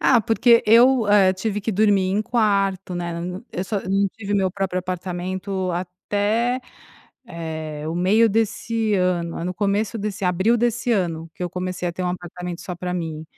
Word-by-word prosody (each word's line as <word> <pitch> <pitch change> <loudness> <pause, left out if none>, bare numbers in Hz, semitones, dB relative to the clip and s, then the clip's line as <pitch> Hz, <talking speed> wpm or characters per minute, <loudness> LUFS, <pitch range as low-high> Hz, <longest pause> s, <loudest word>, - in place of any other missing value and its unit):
Ah, 245 -3 +5
porque 230 +2 +4
eu, 235 +2 +6
hã, 200 -2 +5
tive 210 +2 -3
que 220 - -2
dormir 200 -2 +3
em 205 +2 +1
quarto 195 -5 0
né, 175 -1 -3 0.4
e - - -6
eu - - -2
só 205 +1 -2
não 195 +1 +2
tive 205 -2 -4
meu 190 -2 +2
próprio 190 -1 -2
apartamento 185 +1 -3
até, 205 +7 -1 0.7
eh, 160 -4 -6
o 160 - -3
meio 200 +6 +4
desse 225 0 0
ano, 180 -3 0
aí 165 - -4
no 180 +1 -3
começo 205 +3 0
desse 205 -1 -4
abril 185 +6 +2
desse 240 +1 0
ano 165 -5 -1
que - - -7
eu 175 - -2
comecei 180 0 -3
a - - -4
ter 185 - -5
um - - 0
apartamento 180 0 -6
só 180 - -5
pra 180 0 -4
mim. 160 -3 -4
190 Hz, 185 wpm, -22 LUFS, 180-215 Hz, 0.7 s, eu